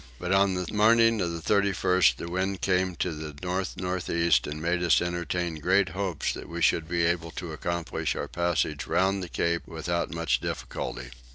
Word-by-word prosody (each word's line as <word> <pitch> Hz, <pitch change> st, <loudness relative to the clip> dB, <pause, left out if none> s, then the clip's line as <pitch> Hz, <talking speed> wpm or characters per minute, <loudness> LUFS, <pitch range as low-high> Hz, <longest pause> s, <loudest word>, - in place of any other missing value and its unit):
But 90 Hz, +5 st, -4 dB
on 95 Hz, -1 st, +3 dB
the 90 Hz, 0 st, -2 dB
morning 115 Hz, +1 st, +4 dB
of 85 Hz, -2 st, 0 dB
the 80 Hz, -2 st, -1 dB
31st 95 Hz, -7 st, +3 dB
the 85 Hz, -, -7 dB
wind 95 Hz, +2 st, -2 dB
came 95 Hz, -1 st, +1 dB
to 90 Hz, -, -1 dB
the 75 Hz, -1 st, -7 dB
north 90 Hz, +1 st, -2 dB
north 90 Hz, -1 st, -3 dB
east 85 Hz, 0 st, +3 dB
and 75 Hz, +1 st, -5 dB
made 85 Hz, +2 st, 0 dB
us 85 Hz, -4 st, +4 dB
entertain 85 Hz, -1 st, -2 dB
great 95 Hz, +3 st, +3 dB
hopes 95 Hz, -2 st, -2 dB
that -, -, -8 dB
we 85 Hz, 0 st, -5 dB
should 80 Hz, -1 st, +2 dB
be 85 Hz, -1 st, +1 dB
able 85 Hz, -1 st, 0 dB
to 85 Hz, -3 st, -5 dB
accomplish 85 Hz, +2 st, -2 dB
our -, -, -3 dB
passage 85 Hz, -4 st, -1 dB
round 95 Hz, +1 st, +1 dB
the 90 Hz, -, -6 dB
Cape 85 Hz, 0 st, -1 dB
without 85 Hz, +1 st, -2 dB
much 85 Hz, 0 st, 0 dB
difficulty. -, -, -5 dB
85 Hz, 190 wpm, -27 LUFS, 85-95 Hz, -, morning